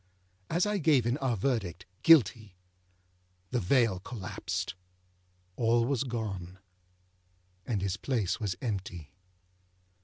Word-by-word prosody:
As 175 +4 +2
I 210 -1 0
gave 145 -7 +4
in 120 +5 0
our 130 -4 0
verdict, 95 -6 -1 0.2
âGuilty,â 115 - +5 1.0
the 125 - +1
veil 115 -2 +2
collapsed, 95 -4 -4 0.8
all 115 +1 +3
was 135 0 0
gone, 95 -7 -4 1.1
and 105 -5 -1
his 100 -1 -1
place 105 -5 -1
was 100 -5 -2
empty. 95 - -4
115 Hz, 110 wpm, -30 LUFS, 95-130 Hz, 1.1 s, âGuilty,â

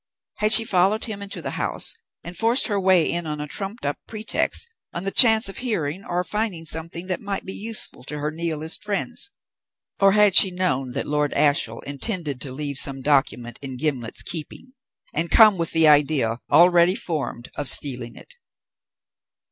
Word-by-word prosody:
Had 215 0 +2
she 225 - +11
followed 195 +3 +1
him 210 -3 -7
into 200 0 -7
the - - -4
house - - 0 0.3
and 175 +1 -9
forced 230 +6 +4
her 205 -3 0
way 185 -3 +3
in 170 -1 -2
on 150 -1 -5
a 150 - -4
trumped 195 +7 -3
up 145 - -3
pretext, 220 - -1 0.3
on 170 - -3
the 195 - -2
chance 220 -2 +5
of 195 - -5
hearing 195 - -3
or 175 +1 -2
finding 210 -5 -3
something 160 +2 -3
that 185 -1 -4
might 200 -2 -5
be 190 - -6
useful 220 - -4
to 150 +2 -2
her 150 +1 -3
Nihilist 160 +1 -2
friends, 210 - -4 0.7
or 195 -1 +4
had 210 -2 +4
she 195 - +8
known 145 -9 -2
that - - -3
Lord 150 0 -1
Ashiel 140 -6 +1
intended 145 - -3
to 135 - -6
leave 140 0 -4
some 135 -1 0
document 130 -4 -1
in 130 -2 -7
Gimblet's 125 -5 -2
keeping, 175 - -5 0.4
and 165 +3 -2
come 215 -5 +6
with 165 - -1
the 160 -1 +3
idea, 145 -6 +2
already 175 +3 +5
formed, 150 - -5
of 145 -3 -2
stealing 125 -4 -2
it? - - -14
170 Hz, 180 wpm, -22 LUFS, 145-200 Hz, 0.7 s, she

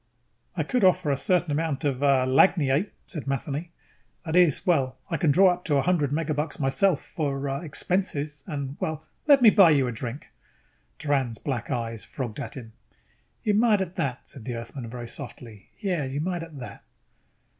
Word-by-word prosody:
"I - - +1
could 250 -4 0
offer 175 -5 +4
a - - +2
certain 175 +3 +1
amount 155 0 -1
of, 140 -3 -1
uh, 135 -2 +4
lagniappe," 145 +4 +3 0.2
said 155 -6 -7
Matheny. 140 +4 -3 0.6
"That 160 0 -2
is, 175 -5 +4
well, 135 -7 +1
I 165 - +1
can 165 - +2
draw 185 +5 +6
up 180 0 -9
to 150 - +1
a 135 - +2
hundred 165 -6 +1
megabucks 155 0 -2
myself 150 +5 +2
for, 140 -3 -3
uh, 135 0 -2
expenses 150 -3 -1
and, 140 -4 -4
well... 155 0 -3 0.2
let 280 -3 +6
me 220 - +9
buy 195 -5 +7
you 140 -4 +4
a 125 - -2
drink!" 120 +4 -6 0.7
Doran's 135 -6 0
black 120 -5 -4
eyes 115 -4 -3
frogged 120 -4 -6
at 140 - -6
him. 115 -3 -10 0.7
"You 210 - +2
might 215 -1 +4
at 185 -2 -3
that," 130 -2 -2
said 130 - -8
the 125 -2 -3
Earthman 115 +1 -7
very 120 0 -7
softly. 115 -3 -9
"Yes, 180 -10 -1
you 140 - -2
might 175 +2 -2
at 165 -3 -9
that." 125 - -9
145 Hz, 185 wpm, -26 LUFS, 130-175 Hz, 0.7 s, me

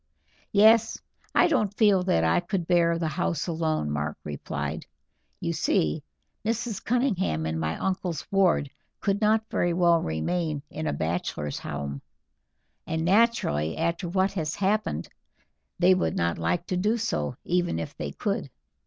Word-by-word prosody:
"Yes. 220 +2 +5 0.4
I - - +6
don't 210 - 0
feel 205 -4 +5
that 80 - +2
I 80 - +3
could 175 0 -2
bear 170 -1 +3
the 165 -1 -1
house 170 -1 -1
alone," 160 - -1
Mark 75 +1 -2
replied. 75 -2 -4 0.5
"You - - -2
see, 75 -1 +1 0.4
Mrs. 225 -1 -2
Cunningham 205 - 0
and 80 0 -2
my 80 0 -1
uncle's 185 -4 -2
ward 180 -8 +3 0.3
could 200 +1 0
not 220 +1 +3
very 175 0 +1
well 170 -1 +4
remain 150 - -2
in 155 - -4
a - - +1
bachelor's 75 -1 -2
home, 70 -1 -5 0.9
and 160 0 -1
naturally, 185 - +2
after 170 +2 -1
what 190 +2 +2
has 160 -5 -2
happened, 210 +2 0 0.7
they 185 +1 +5
would 185 - 0
not 85 0 0
like 85 +1 0
to 180 - -2
do 210 +5 +1
so, 100 - -2
even 175 - +1
if 80 -1 -5
they - - -4
could. - - -2
170 Hz, 150 wpm, -26 LUFS, -, 0.9 s, I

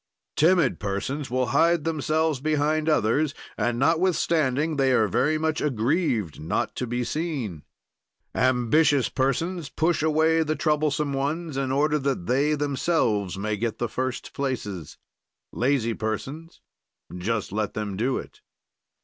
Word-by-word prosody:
"Timid 165 -4 +3
persons 105 +9 -3
will 130 +1 +1
hide 165 +2 +3
themselves 155 -1 0
behind 155 +2 +1
others 145 +2 +2 0.2
and, 120 -1 0
notwithstanding, 160 -1 +1
they 135 -1 +3
are 110 -3 +3
very 135 - +1
much 160 0 -1
aggrieved 120 - 0
not 80 - -2
to 125 - -2
be 120 +1 -1
seen. 135 - -3 0.7
"Ambitious 130 +3 +3
persons 150 +5 -1
push 165 0 +1
away 160 +1 +3
the 155 -1 0
troublesome 150 -2 0
ones, 150 +3 -2
in 135 -1 -1
order 150 +2 +2
that 135 -10 -2
they 140 +6 +2
themselves 135 - 0
may 105 +2 -1
get 110 +1 -2
the 120 - -1
first 130 +2 -4
places. 105 - -4 0.5
"Lazy 120 -2 +1
persons 135 +10 -5 0.5
just 105 +3 -2
let 105 +1 -2
them 105 -2 -3
do 125 +6 0
it. - - -9
140 Hz, 130 wpm, -25 LUFS, 115-155 Hz, 0.7 s, Timid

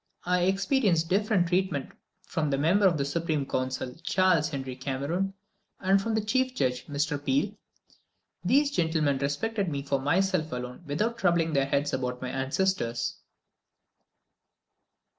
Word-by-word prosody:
I 180 0 +2
experienced 190 - +2
different 200 -1 +2
treatment 180 -6 0 0.3
from 155 -3 -1
the 135 - +1
member 180 +8 +4
of 170 -4 +2
the 140 - 0
Supreme 155 -1 -1
Council, 130 -1 -2
Charles 180 -3 +2
Henry 135 -4 -5
Cameron, 145 +9 -2 0.4
and 195 +1 +3
from 225 +2 -1
the 220 -1 0
chief 255 +3 +1
judge, 125 - -1
Mr. 145 0 -1
Peel. 270 - +1 0.9
These 280 +9 +3
gentlemen 160 - +1
respected 195 +8 -1
me 140 -2 -3
for 140 -1 0
myself 180 +2 +1
alone 125 0 -5
without 215 +12 -1
troubling 170 -3 +2
their 135 -1 +2
heads 145 +1 0
about 125 -1 -2
my 130 - -4
ancestors. 130 -4 -1
160 Hz, 140 wpm, -28 LUFS, 140-190 Hz, 0.9 s, member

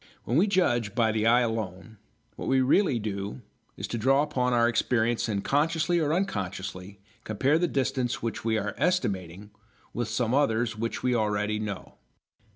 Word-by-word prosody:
When 120 - -2
we 180 +8 +4
judge 120 - +1
by 115 -2 +3
the 110 0 +1
eye 120 +2 +5
alone, 110 -2 -4 0.4
what - - -6
we 130 0 +3
really 135 +2 +3
do 100 - -4 0.4
is - - -4
to 115 - -3
draw 135 +5 +3
upon 130 -4 0
our 120 -1 +4
experience 115 0 +1
and 100 -2 -1
consciously 165 +4 +1
or 150 -2 +1
unconsciously 100 - -3 0.2
compare 135 +9 +1
the 175 - +2
distance 135 -4 -1
which 115 -1 -4
we 110 -1 +1
are 105 -1 -2
estimating 100 - -1 0.4
with 120 -1 -2
some 115 +1 -1
others 120 -5 +1
which 115 +2 -4
we 125 -1 +2
already 105 -1 0
know. 105 -3 -6
115 Hz, 165 wpm, -27 LUFS, 105-135 Hz, 0.4 s, eye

